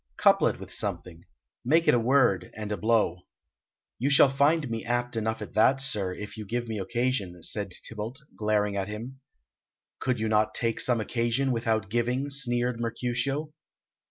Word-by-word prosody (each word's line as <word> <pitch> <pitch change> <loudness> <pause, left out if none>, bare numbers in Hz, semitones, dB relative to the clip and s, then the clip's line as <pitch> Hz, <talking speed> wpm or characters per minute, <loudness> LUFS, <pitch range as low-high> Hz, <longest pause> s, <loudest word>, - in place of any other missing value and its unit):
"Couple - - +5
it - - -2
with - - -7
something: 85 -1 -3 0.4
make 160 +6 +3
it - - +6
a 120 - +4
word 115 -7 +3
and 105 -1 -5
a - - +1
blow." 105 -6 +1 0.7
"You 130 +4 +1
shall 140 -1 +6
find 145 +3 +2
me 115 -1 -4
apt 120 0 -1
enough 110 0 -2
at - - -10
that, 130 +5 +4
sir, 105 -9 0
if 105 +4 -8
you 110 - -5
give 120 +4 -3
me 110 -2 -3
occasion," 100 -4 -2
said 100 -2 -2 0.2
Tybalt, 115 +4 -6 0.2
glaring 105 -1 0
at 95 -1 -2
him. 115 +6 -7 0.8
"Could 130 -3 -1
you 110 - 0
not 110 0 +2
take 115 -2 0
some 120 -2 +2
occasion 120 +4 0
without 110 -3 0
giving?" 125 +4 0
sneered 120 -3 +1
Mercutio. 125 +6 -2
115 Hz, 170 wpm, -27 LUFS, 105-130 Hz, 0.8 s, it